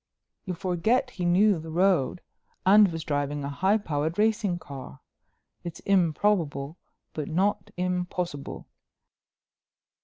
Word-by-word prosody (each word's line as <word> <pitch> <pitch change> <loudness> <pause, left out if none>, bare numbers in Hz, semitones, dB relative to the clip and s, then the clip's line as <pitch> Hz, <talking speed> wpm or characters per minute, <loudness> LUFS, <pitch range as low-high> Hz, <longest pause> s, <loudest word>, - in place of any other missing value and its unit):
"You 185 -3 -3
forget 185 +7 0
he 180 - -4
knew 190 +2 +4
the 160 +1 -8
road 175 -2 +2 0.4
and 200 0 +7
was 165 -1 -5
driving 145 0 -2
a 140 - -3
high 190 +9 +2
powered 160 -4 -2
racing 210 -4 +1
car. 135 - -10 0.6
It's 170 -2 -7
improbable 170 -5 +1 0.3
but 150 -2 -4
not 190 +5 0
impossible." 180 -4 -3
175 Hz, 115 wpm, -27 LUFS, 155-195 Hz, 0.6 s, and